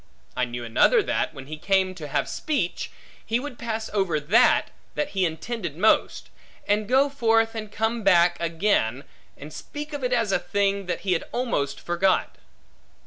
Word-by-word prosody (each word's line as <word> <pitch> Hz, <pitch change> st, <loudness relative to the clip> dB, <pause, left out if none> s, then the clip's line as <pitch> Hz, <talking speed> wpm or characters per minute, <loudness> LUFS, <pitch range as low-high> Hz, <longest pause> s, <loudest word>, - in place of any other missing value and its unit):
I 125 Hz, -, +1 dB
knew 120 Hz, 0 st, -6 dB
another 405 Hz, -, +4 dB
that, -, -, -1 dB
when 135 Hz, -2 st, -10 dB
he 155 Hz, +2 st, -7 dB
came 190 Hz, +2 st, +1 dB
to 160 Hz, -5 st, -8 dB
have 140 Hz, -, -1 dB
speech, 275 Hz, -, -2 dB, 0.3 s
he 230 Hz, +2 st, 0 dB
would 255 Hz, -2 st, -7 dB
pass 225 Hz, -1 st, -3 dB
over 190 Hz, -7 st, +1 dB
that, 215 Hz, +12 st, +3 dB, 0.2 s
that 295 Hz, -1 st, -1 dB
he 190 Hz, -8 st, +1 dB
intended 170 Hz, 0 st, -5 dB
most; 215 Hz, +5 st, +2 dB, 0.4 s
and 210 Hz, 0 st, +1 dB
go 265 Hz, +3 st, +4 dB
forth, 225 Hz, -5 st, +2 dB
and 215 Hz, -2 st, -6 dB
come 225 Hz, +2 st, -1 dB
back 175 Hz, -3 st, +4 dB
again, 165 Hz, -, 0 dB, 0.3 s
and 150 Hz, +2 st, -10 dB
speak 295 Hz, +1 st, -7 dB
of 285 Hz, -2 st, -5 dB
it 250 Hz, -, 0 dB
as 230 Hz, -5 st, +1 dB
of -, -, +1 dB
a -, -, -19 dB
thing, 200 Hz, -1 st, 0 dB
that 180 Hz, -, -2 dB
he 190 Hz, -2 st, +1 dB
had 165 Hz, -, -1 dB
almost 235 Hz, -, -1 dB
forgot. 180 Hz, +2 st, 0 dB
200 Hz, 180 wpm, -25 LUFS, 170-230 Hz, 0.4 s, another